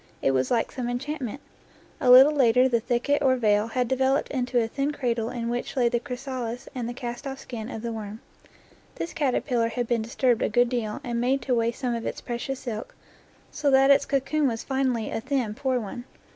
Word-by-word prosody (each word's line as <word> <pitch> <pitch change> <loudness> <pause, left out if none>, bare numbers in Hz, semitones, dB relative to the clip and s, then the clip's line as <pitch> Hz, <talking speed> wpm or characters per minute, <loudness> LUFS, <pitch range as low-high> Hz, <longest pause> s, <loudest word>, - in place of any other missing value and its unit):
It 135 - +2
was 130 -1 +1
like 235 -2 +1
some 245 -2 -3
enchantment. 270 0 -4 0.6
A 255 - +1
little 260 +4 +9
later 250 -2 +4
the 240 -3 +2
thicket, 245 +5 0
or 265 -2 +4
veil, 210 -3 +2
had 250 +1 -1
developed 265 +2 +1
into 250 -2 0
a 225 - +1
thin 275 +5 -1
cradle 235 -5 -1
in 240 -2 -4
which 240 +3 -3
lay 240 -2 +4
the 240 0 0
chrysalis 250 -1 -5
and 245 -3 -3
the - - -4
cast 240 +2 -5
off 270 0 -5
skin 235 -4 -7
of 225 -4 -6
the 235 - -2
worm. 215 -1 -6 0.8
This 335 - -5
caterpillar 250 -4 0
had 240 +1 -2
been 235 -1 0
disturbed 235 +1 +1
a - - +1
good 245 +2 +3
deal 235 0 -3
and 240 -3 -2
made 260 +1 +1
to 255 - 0
waste 230 0 0
some 250 -2 0
of 230 -1 -3
its - - -4
precious 250 +2 -4
silk, 220 -3 -6 0.6
so 290 -1 0
that 270 0 +6
its 280 - +5
cocoon 280 +2 +1
was 225 -3 -2
finally 260 -4 -1
a - - -2
thin, 260 -4 -1
poor 260 +1 0
one. 240 +3 -7
245 Hz, 215 wpm, -26 LUFS, 230-265 Hz, 0.8 s, little